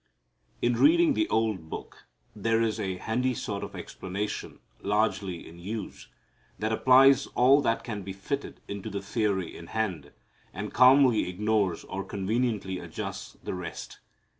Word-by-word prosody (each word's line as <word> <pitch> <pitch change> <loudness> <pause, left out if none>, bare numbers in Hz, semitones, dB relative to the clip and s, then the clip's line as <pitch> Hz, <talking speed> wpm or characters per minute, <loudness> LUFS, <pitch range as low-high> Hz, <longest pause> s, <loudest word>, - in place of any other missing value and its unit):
In 120 -1 +2
reading 330 0 +5
the 325 +4 0
old 105 -8 0
Book - - -9 0.3
there 115 +2 +1
is 115 -1 0
a 95 -3 -2
handy 125 +5 0
sort 100 -3 -4
of - - -7
explanation 100 +3 -5 0.2
largely 100 -3 0
in 85 +1 -13
use 100 +3 -6 0.5
that 110 +1 -1
applies 130 +4 +6
all 135 +4 +6
that 115 -4 0
can 110 -4 -5
be 95 0 -6
fitted 135 +9 -5
into 100 +1 -5
the 100 -1 -4
theory 100 -4 -1
in 85 - -10
hand, 90 -9 -3 0.4
and 100 +3 -5
calmly 125 -5 +6
ignores 100 -1 0
or 95 +1 -5
conveniently 100 -1 -1
adjusts - - -6
the - - -4
rest. 90 -3 -7
105 Hz, 145 wpm, -28 LUFS, 95-120 Hz, 0.5 s, applies